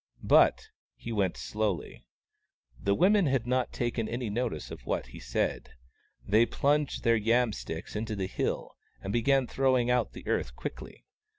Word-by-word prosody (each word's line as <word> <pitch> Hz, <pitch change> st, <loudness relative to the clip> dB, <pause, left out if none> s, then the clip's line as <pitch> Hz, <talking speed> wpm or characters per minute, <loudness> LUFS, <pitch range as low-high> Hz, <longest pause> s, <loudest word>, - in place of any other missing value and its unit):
But -, -, +4 dB, 0.3 s
he 115 Hz, -, -7 dB
went 100 Hz, -5 st, 0 dB
slowly. 95 Hz, -, -3 dB, 0.7 s
The 100 Hz, +8 st, +1 dB
women 195 Hz, -, +4 dB
had 135 Hz, -4 st, +1 dB
not 125 Hz, 0 st, 0 dB
taken 120 Hz, -2 st, -2 dB
any 120 Hz, -2 st, -3 dB
notice 105 Hz, -9 st, -3 dB
of -, -, -10 dB
what -, -, -1 dB
he -, -, -11 dB
said. -, -, -2 dB, 0.5 s
They 110 Hz, +3 st, +4 dB
plunged 145 Hz, 0 st, 0 dB
their 115 Hz, 0 st, +4 dB
yam 115 Hz, +1 st, +2 dB
sticks 80 Hz, 0 st, -6 dB
into 110 Hz, 0 st, -3 dB
the 95 Hz, -2 st, -2 dB
hill, 95 Hz, -, -3 dB, 0.3 s
and 95 Hz, -, -3 dB
began 135 Hz, +3 st, +3 dB
throwing 130 Hz, -1 st, +2 dB
out 125 Hz, -3 st, +1 dB
the -, -, -10 dB
earth 60 Hz, -, -1 dB
quickly. -, -, -8 dB
115 Hz, 160 wpm, -29 LUFS, 105-125 Hz, 0.7 s, But